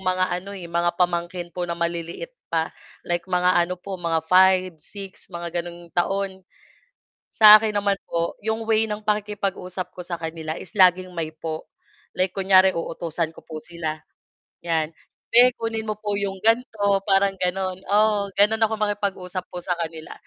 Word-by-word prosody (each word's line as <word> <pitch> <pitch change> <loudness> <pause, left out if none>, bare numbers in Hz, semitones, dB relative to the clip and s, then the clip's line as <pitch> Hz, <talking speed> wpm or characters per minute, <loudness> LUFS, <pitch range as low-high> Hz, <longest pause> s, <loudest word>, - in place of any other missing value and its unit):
mga 185 0 +1 0.2
ano, 195 - -10
eh, 180 - -8
mga 170 0 +1
pamangkin 175 0 -1
po 180 -1 -3
na 170 - -1
maliliit 170 - -4 0.2
pa 165 -1 0 0.3
like 175 +1 -2
mga 180 0 +3 0.2
ano 180 - -3
po 190 +1 -7
mga 165 -2 0
5-6 185 +1 +2
mga 170 -1 -5
ganong 170 0 -10
taon. 190 +2 -2 0.9
Sa 215 -1 +10
akin 215 -1 -2
naman 200 -1 +1
po 170 0 -2
'yong 220 0 -1
way 220 0 +4
ng 210 0 -4
pakikipag-usap 200 -3 -2
ko 180 - -9
sa 170 -2 -5
kanila 160 -1 -4
is - - -9
laging 185 -1 +5
may 160 -1 -3
po 160 0 -5 0.5
like 185 0 +2
kunyari 190 0 +5
uutusan 165 -1 -3
ko - - -14
po 155 - -7
sila 160 -1 -5 0.6
'yan, 165 -2 -1 0.4
"Be, 245 +2 +8
kunin 225 -1 -3
mo 215 - -2
po 210 -1 -3
'yong 200 -1 -2
ganto.", 220 -4 +2
parang 195 0 +4
gano'n 185 0 -1
oo, 205 -1 +3
gano'n 215 +2 +4
ako 220 0 +3
makipag-usap 200 -3 -2
po 180 - -8
sa 180 - +1
kanila 160 -1 -6
185 Hz, 165 wpm, -23 LUFS, 170-200 Hz, 0.9 s, Sa